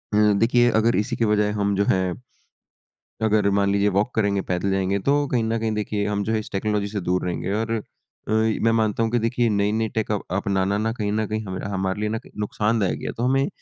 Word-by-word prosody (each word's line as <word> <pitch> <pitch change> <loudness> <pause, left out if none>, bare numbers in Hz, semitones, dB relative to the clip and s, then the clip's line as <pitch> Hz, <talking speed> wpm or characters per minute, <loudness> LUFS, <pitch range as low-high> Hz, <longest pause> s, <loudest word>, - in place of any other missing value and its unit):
देखिए, 115 +4 +4
अगर 115 +2 +3
इसी 105 +6 0
के 115 - +1
बजाय 105 -1 +2
हम 100 -1 +1
जो 100 - +2
है, 95 -1 +1 1.1
अगर 105 -2 +3
मान 100 0 +2
लीजिए 100 +1 +2
वॉक 105 +5 +1
करेंगे, 100 -3 +1
पैदल 90 +1 -1
जाएँगे, 95 +1 0
तो 145 +6 +1
कहीं 125 -3 0
न 115 +1 0
कहीं 110 0 -1
देखिए, 105 -1 -2
हम 100 -1 -1
जो 110 - -2
है, 110 - +1
इस 105 - -8
टेक्नोलॉजी 105 +1 -1
से 100 0 -4
दूर 90 +1 0
रहेंगे 90 +2 -2
और 110 +2 -1 0.6
अ, - - -3
मैं 110 +1 +2
मानता 110 -1 +1
हूँ 115 - -1
कि 120 - +2
देखिए, 115 +1 +1
नई-नई 105 +2 +1
टेक 110 -1 -1
अपनाना 100 -1 -1
ना, 110 +2 0
कहीं 105 -3 -2
न 110 +1 0
कहीं 110 +1 -3
हमरा 95 0 -5
हमारे 95 +1 -1
लिए 105 - -1
ना, 110 - -1
क - - -14
नुकसानदायक 105 -6 0
है। - - -2
तो 120 - -4
हमें 135 +2 +2
105 Hz, 225 wpm, -23 LUFS, 100-110 Hz, 1.1 s, देखिए